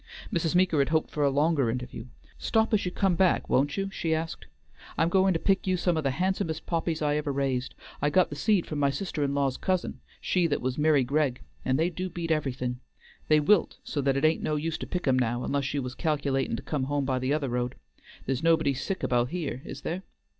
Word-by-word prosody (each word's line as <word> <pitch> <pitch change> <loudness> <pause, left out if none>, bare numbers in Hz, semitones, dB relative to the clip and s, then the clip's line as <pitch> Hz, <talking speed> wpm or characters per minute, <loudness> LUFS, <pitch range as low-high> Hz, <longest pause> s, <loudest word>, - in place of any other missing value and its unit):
Mrs. 165 -1 0
Meeker 180 -4 +3
had 140 - +2
hoped 160 0 +1
for 150 - -1
a 140 - +4
longer 145 -2 +2
interview. 125 0 -5 0.3
"Stop 220 0 +1
as 205 - +2
you 180 - -1
come 195 0 +1
back, 180 +1 +2
won't 145 +2 +1
you?" 195 0 -2
she 165 -4 0
asked. 160 +1 -5 0.5
"I'm 165 - +3
goin' 190 +1 +4
to - - +1
pick 195 +1 +1
you 185 0 +2
some 175 -1 +1
of 155 - -1
the 135 - +2
handsomest 180 -3 -1
poppies 165 -2 -1
I 150 0 +2
ever 150 -1 -1
raised. 135 -2 -1 0.3
I 145 - +3
got 185 +1 +3
the - - -4
seed 190 +4 +2
from 150 - -4
my 140 -1 +3
sister 150 +1 -2
in 140 0 0
law's 140 -2 +1
cousin, 185 -1 -1 0.2
she 180 -2 +1
that 145 - 0
was 125 0 -2
'Miry 150 -2 +3
Gregg, 135 -1 0 0.2
and 130 - +1
they 165 +4 +1
do 185 +2 -4
beat 170 -1 -4
everything. 125 -5 -1 0.5
They 155 0 +5
wilt 170 +5 +3
so 145 - -2
that 135 0 +1
it 140 - +2
ain't 160 +1 +3
no 155 - 0
use 160 +2 -2
to - - -5
pick 180 -4 -3
'em 130 -1 +4
now, 120 0 0
unless 140 -1 -1
you 140 -2 -1
was 125 0 -5
calc'latin' 140 -5 0
to - - -8
come 145 -4 -2
home 145 0 -1
by 130 -1 0
the 130 +2 -1
other 145 -3 0
road. 125 +1 -2 0.5
There's 135 -1 -1
nobody 160 -3 +3
sick 185 +8 -4
about 120 0 +1
here, 155 -8 -3
is - - -7
there?" 175 +3 -3
150 Hz, 235 wpm, -28 LUFS, 135-170 Hz, 0.5 s, They